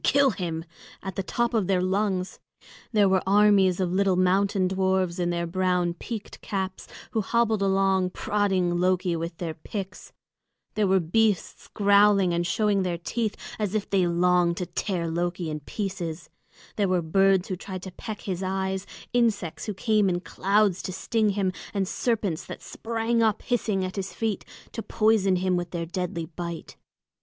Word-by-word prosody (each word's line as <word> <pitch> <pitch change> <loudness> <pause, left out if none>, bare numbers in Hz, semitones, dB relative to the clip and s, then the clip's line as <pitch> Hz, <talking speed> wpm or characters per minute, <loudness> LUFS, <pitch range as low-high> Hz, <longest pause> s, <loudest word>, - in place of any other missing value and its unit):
kill 280 -1 +4
him!" 165 -3 -4 0.4
at 190 0 -4
the - - -1
top 235 +5 -1
of 215 -5 +1
their 190 -2 +2
lungs; 190 0 -1 0.5
there 210 -3 +4
were 190 -1 +3
armies 195 -2 +5
of 180 -2 0
little 195 -1 +3
mountain 185 +1 +2
dwarfs 190 -1 0
in 175 -1 +1
their 170 0 -1
brown 180 0 +1
peaked 215 +4 -7
caps, 190 -2 -4 0.2
who 220 - +1
hobbled 225 -1 +1
along, 195 -1 +2
prodding 185 -3 0
Loki 180 -1 +1
with 165 0 -4
their 165 -3 -3
picks; 190 +5 -7 0.6
there 210 -2 +1
were 190 0 +4
beasts 200 +3 0
growling 200 -2 +5
and 170 0 0
showing 205 +1 +2
their 180 -2 -1
teeth 215 +5 -2 0.2
as 210 -1 -1
if 210 - -1
they 190 -3 +3
longed 175 0 +2
to 180 - -2
tear 175 -2 -2
Loki 175 0 -2
in 150 - -3
pieces; 170 -2 -5 0.5
there 200 -3 +2
were 180 -2 +1
birds 195 +3 +3
who 185 - -1
tried 185 0 -7
to 190 - -7
peck 215 +3 -7
his 185 -2 -3
eyes, 190 0 -2 0.3
insects 205 -9 0
who 210 - -3
came 215 -1 +2
in 175 -1 0
clouds 195 +1 +1
to - - -4
sting 215 +3 0
him, 195 -2 0 0.2
and 195 -2 0
serpents 205 -7 -1
that - - -9
sprang 230 +1 -1
up 220 -2 +2
hissing 215 -6 0
at 185 +2 -6
his 195 0 -4
feet 220 -4 -2 0.3
to 225 - -4
poison 215 -4 +2
him 185 0 +1
with 175 -1 -2
their 170 -1 -3
deadly 175 -1 -3
bite. 170 0 -7
190 Hz, 170 wpm, -26 LUFS, 180-205 Hz, 0.6 s, armies